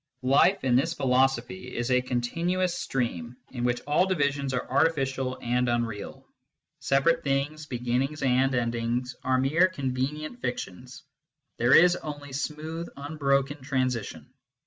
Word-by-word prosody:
Life, 140 Hz, +9 st, +4 dB
in 125 Hz, -2 st, +3 dB
this 165 Hz, +6 st, +2 dB
philosophy, 125 Hz, -3 st, 0 dB
is 120 Hz, +2 st, -1 dB
a 125 Hz, 0 st, +4 dB
continuous 170 Hz, +9 st, -1 dB
stream, 120 Hz, -, -3 dB
in 120 Hz, -2 st, -4 dB
which 120 Hz, 0 st, 0 dB
all 150 Hz, +6 st, +2 dB
divisions 140 Hz, -6 st, 0 dB
are 125 Hz, -1 st, -2 dB
artificial 135 Hz, -3 st, +1 dB
and 125 Hz, +1 st, +1 dB
unreal. 115 Hz, -3 st, -3 dB, 0.5 s
Separate 165 Hz, +5 st, +2 dB
things, 145 Hz, +2 st, -1 dB
beginnings 125 Hz, +4 st, -1 dB
and 130 Hz, 0 st, +2 dB
endings, 120 Hz, +1 st, -1 dB
are 130 Hz, 0 st, +2 dB
mere 150 Hz, +8 st, +4 dB
convenient 150 Hz, -, -3 dB
fictions: 125 Hz, +1 st, -5 dB, 0.6 s
there 120 Hz, +2 st, +5 dB
is 175 Hz, +1 st, +6 dB
only 145 Hz, -2 st, -7 dB
smooth 155 Hz, +4 st, -4 dB
unbroken 140 Hz, -1 st, 0 dB
transition. 130 Hz, -4 st, -2 dB
135 Hz, 125 wpm, -27 LUFS, 125-150 Hz, 0.6 s, is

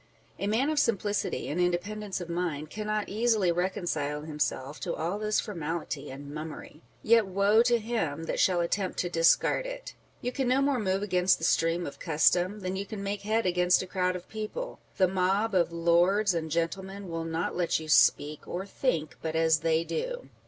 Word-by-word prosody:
A 200 Hz, -, -1 dB
man 245 Hz, +8 st, +2 dB
of 305 Hz, -, +1 dB
simplicity 210 Hz, -5 st, 0 dB
and 170 Hz, +5 st, -1 dB
independence 195 Hz, +4 st, -1 dB
of 175 Hz, -, -6 dB
mind 170 Hz, -4 st, -3 dB
cannot 215 Hz, 0 st, -2 dB
easily 215 Hz, -3 st, +2 dB
reconcile 170 Hz, -5 st, -1 dB
himself 150 Hz, -2 st, -3 dB
to -, -, -3 dB
all 175 Hz, +6 st, -2 dB
this 215 Hz, 0 st, +1 dB
formality 160 Hz, -6 st, -4 dB
and 140 Hz, +2 st, -8 dB
mummery; 155 Hz, 0 st, -8 dB, 0.2 s
yet 225 Hz, -2 st, +4 dB
woe 200 Hz, +4 st, +4 dB
to 240 Hz, 0 st, +3 dB
him 210 Hz, -10 st, -2 dB
that -, -, -3 dB
shall 180 Hz, -2 st, +3 dB
attempt 185 Hz, +2 st, -1 dB
to 175 Hz, -, -1 dB
discard 165 Hz, -, +3 dB
it! -, -, -7 dB, 0.3 s
You 245 Hz, -, -3 dB
can 265 Hz, 0 st, -1 dB
no 255 Hz, +2 st, +3 dB
more 275 Hz, -2 st, +2 dB
move 195 Hz, -1 st, 0 dB
against 180 Hz, -2 st, +3 dB
the -, -, -10 dB
stream 165 Hz, +1 st, +2 dB
of 140 Hz, -, -8 dB
custom 180 Hz, +5 st, +2 dB
than 185 Hz, 0 st, -3 dB
you 195 Hz, +1 st, -3 dB
can 200 Hz, -1 st, -6 dB
make 200 Hz, 0 st, -3 dB
head 220 Hz, +2 st, 0 dB
against 180 Hz, 0 st, +3 dB
a -, -, -6 dB
crowd 185 Hz, 0 st, -1 dB
of 180 Hz, 0 st, -7 dB
people; 220 Hz, -, -5 dB, 0.2 s
the 185 Hz, -, +4 dB
mob 190 Hz, +4 st, +1 dB
of 175 Hz, -2 st, +2 dB
lords 175 Hz, +4 st, +3 dB
and 160 Hz, -2 st, -2 dB
gentlemen 190 Hz, +5 st, -3 dB
will 165 Hz, -1 st, -3 dB
not 165 Hz, +1 st, -2 dB
let 175 Hz, -2 st, +1 dB
you 160 Hz, -, -8 dB
speak 150 Hz, -1 st, +3 dB
or 185 Hz, +2 st, -4 dB
think 180 Hz, -, -2 dB
but 160 Hz, 0 st, -3 dB
as 160 Hz, -1 st, +3 dB
they 165 Hz, +1 st, +1 dB
do. -, -, -4 dB
185 Hz, 190 wpm, -28 LUFS, 165-210 Hz, 0.3 s, yet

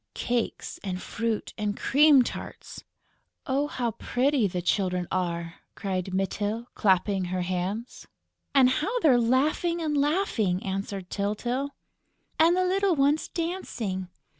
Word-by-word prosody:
"Cakes 240 Hz, -2 st, -2 dB
and 185 Hz, -2 st, -3 dB
fruit 225 Hz, +2 st, -3 dB
and 210 Hz, 0 st, -1 dB
cream 285 Hz, -1 st, +6 dB
tarts." -, -, -7 dB, 0.6 s
"Oh, 280 Hz, +2 st, +1 dB
how 240 Hz, -5 st, -2 dB
pretty 250 Hz, +1 st, +1 dB
the 180 Hz, -1 st, -3 dB
children 180 Hz, 0 st, 0 dB
are!" 170 Hz, -2 st, -2 dB, 0.2 s
cried 190 Hz, -2 st, -3 dB
Mytyl, 205 Hz, +4 st, -1 dB
clapping 190 Hz, -1 st, +2 dB
her 180 Hz, 0 st, -2 dB
hands. 185 Hz, +6 st, -4 dB, 0.5 s
"And 265 Hz, -2 st, +7 dB
how 410 Hz, -, 0 dB
they're 255 Hz, -8 st, +5 dB
laughing 300 Hz, +8 st, +1 dB
and 310 Hz, -3 st, -1 dB
laughing!" 280 Hz, -, +1 dB
answered 195 Hz, -1 st, -4 dB
Tyltyl. 240 Hz, +7 st, -2 dB, 0.6 s
"And 335 Hz, +3 st, +5 dB
the 370 Hz, -, +2 dB
little 385 Hz, 0 st, +2 dB
ones 285 Hz, +2 st, +2 dB
dancing!..." 235 Hz, -, -3 dB
230 Hz, 125 wpm, -27 LUFS, 190-285 Hz, 0.6 s, And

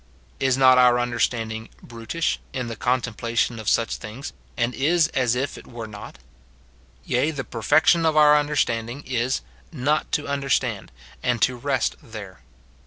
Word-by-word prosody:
Is 135 Hz, -1 st, +2 dB
not 130 Hz, -1 st, +6 dB
our 125 Hz, -1 st, +6 dB
understanding 115 Hz, -2 st, -1 dB
" -, -, -26 dB
brutish" 115 Hz, +8 st, -3 dB
in 130 Hz, -2 st, -3 dB
the 115 Hz, -, -5 dB
contemplation 115 Hz, 0 st, -1 dB
of 110 Hz, -, -1 dB
such 115 Hz, -, +1 dB
things, 115 Hz, +5 st, -8 dB, 0.2 s
and 120 Hz, +1 st, 0 dB
is 160 Hz, +4 st, +2 dB
as 125 Hz, -5 st, +1 dB
if 135 Hz, +3 st, -3 dB
it -, -, -15 dB
were 115 Hz, -2 st, -7 dB
not? 105 Hz, -2 st, -10 dB, 0.9 s
Yea, 125 Hz, +5 st, +1 dB
the 145 Hz, -4 st, -4 dB
perfection 150 Hz, +9 st, +3 dB
of 160 Hz, -1 st, +2 dB
our 150 Hz, -1 st, +7 dB
understanding 140 Hz, -4 st, 0 dB
is, 125 Hz, -, -1 dB, 0.3 s
not 150 Hz, +5 st, 0 dB
to 150 Hz, -, 0 dB
understand, 140 Hz, -2 st, -1 dB, 0.3 s
and 125 Hz, -1 st, 0 dB
to 130 Hz, -, +2 dB
rest 130 Hz, 0 st, -1 dB
there. 105 Hz, -5 st, -10 dB
125 Hz, 155 wpm, -23 LUFS, 115-140 Hz, 0.9 s, our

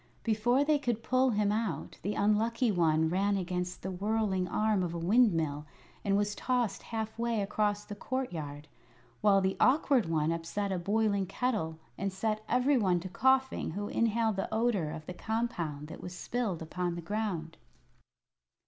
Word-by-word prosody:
Before 240 Hz, +5 st, +2 dB
they 295 Hz, 0 st, +3 dB
could 240 Hz, -5 st, -2 dB
pull 255 Hz, +2 st, +3 dB
him 210 Hz, -3 st, +2 dB
out 210 Hz, -8 st, -2 dB
the 205 Hz, +2 st, -2 dB
Unlucky 225 Hz, +3 st, +2 dB
One 160 Hz, -3 st, +3 dB
ran 195 Hz, +4 st, +1 dB
against 180 Hz, -1 st, -3 dB
the 190 Hz, -, -3 dB
whirling 195 Hz, -1 st, 0 dB
arm 215 Hz, +1 st, +1 dB
of 175 Hz, -2 st, -2 dB
a -, -, -2 dB
windmill 165 Hz, -7 st, +2 dB, 0.4 s
and 200 Hz, -1 st, +2 dB
was 205 Hz, 0 st, 0 dB
tossed 245 Hz, -5 st, -1 dB
half 220 Hz, -1 st, -5 dB
way 235 Hz, -1 st, 0 dB
across 205 Hz, +1 st, 0 dB
the -, -, -7 dB
courtyard, 165 Hz, -, -4 dB, 0.5 s
while 200 Hz, -2 st, +5 dB
the 190 Hz, 0 st, +1 dB
Awkward 265 Hz, -, +4 dB
One 160 Hz, -1 st, +1 dB
upset 170 Hz, +5 st, -2 dB
a 185 Hz, -, -1 dB
boiling 200 Hz, +1 st, +1 dB
kettle 195 Hz, -7 st, -1 dB, 0.2 s
and 195 Hz, 0 st, -1 dB
set 215 Hz, +3 st, -2 dB
every 255 Hz, +3 st, +3 dB
one 185 Hz, -5 st, +2 dB
to 185 Hz, -, -6 dB
coughing 265 Hz, -1 st, +2 dB
who 205 Hz, 0 st, -3 dB
inhaled 225 Hz, -2 st, +1 dB
the 195 Hz, -, -2 dB
odor 220 Hz, -7 st, +1 dB
of 155 Hz, 0 st, -7 dB
the 180 Hz, -, -6 dB
compound 175 Hz, -9 st, -3 dB
that -, -, -9 dB
was 180 Hz, 0 st, -7 dB
spilled 210 Hz, -7 st, -2 dB
upon 175 Hz, +1 st, -2 dB
the 170 Hz, -, -5 dB
ground. 170 Hz, -4 st, -3 dB
205 Hz, 165 wpm, -31 LUFS, 175-225 Hz, 0.5 s, while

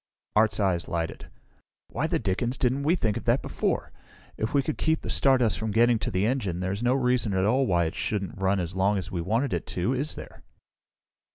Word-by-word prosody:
Art's 110 Hz, +1 st, +3 dB
eyes 95 Hz, -4 st, +1 dB
lighted. 85 Hz, -1 st, -4 dB, 0.6 s
"Why -, -, -1 dB
the -, -, 0 dB
dickens 120 Hz, +5 st, -1 dB
didn't 130 Hz, +2 st, +1 dB
we 155 Hz, +5 st, +2 dB
think 110 Hz, -, 0 dB
of -, -, -7 dB
that -, -, +2 dB
before? -, -, -2 dB, 0.4 s
If 110 Hz, -, -2 dB
we 140 Hz, -1 st, +2 dB
could 155 Hz, -, -3 dB
keep 160 Hz, 0 st, +1 dB
the -, -, -4 dB
stardust 130 Hz, -5 st, +3 dB
from 110 Hz, -, -2 dB
getting 115 Hz, +2 st, +3 dB
to -, -, -2 dB
the 95 Hz, +2 st, 0 dB
engine, 105 Hz, -8 st, -1 dB
there's 95 Hz, +3 st, -2 dB
no 125 Hz, +2 st, +2 dB
reason 125 Hz, -6 st, +1 dB
at 95 Hz, 0 st, +2 dB
all 130 Hz, +5 st, +2 dB
why 85 Hz, -3 st, +2 dB
it 80 Hz, -, -3 dB
shouldn't 95 Hz, -3 st, -3 dB
run 95 Hz, +1 st, +2 dB
as 90 Hz, 0 st, -3 dB
long 100 Hz, +2 st, +2 dB
as 95 Hz, -, -5 dB
we 85 Hz, -, -2 dB
wanted 115 Hz, +9 st, 0 dB
it -, -, -3 dB
to, 95 Hz, +8 st, -1 dB
is 140 Hz, +4 st, -2 dB
there?" -, -, -10 dB
110 Hz, 215 wpm, -26 LUFS, 95-125 Hz, 0.6 s, Art's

